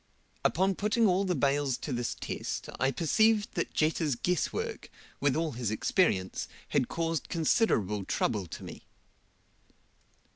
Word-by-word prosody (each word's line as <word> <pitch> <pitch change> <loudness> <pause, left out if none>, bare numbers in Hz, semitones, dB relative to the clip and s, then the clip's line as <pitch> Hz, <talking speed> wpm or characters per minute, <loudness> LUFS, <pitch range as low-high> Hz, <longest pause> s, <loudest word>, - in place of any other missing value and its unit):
Upon 190 +4 +2
putting 210 +4 +1
all 190 0 +3
the 180 -2 0
bales 140 -2 +1
to 145 - -4
this 120 -1 -2
test, - - -4
I 135 - +3
perceived 210 - +2
that 170 - -2
Jetta's 155 -3 +1
guess 180 +6 0
work, - - -4 0.3
with 140 -1 +2
all 160 -1 0
his 120 -4 -2
experience, 110 - +1 0.2
had 125 - +1
caused 165 -2 -2
considerable 115 - +2
trouble 100 -2 0
to - - -8
me. - - -10
155 Hz, 140 wpm, -30 LUFS, 125-180 Hz, 0.3 s, all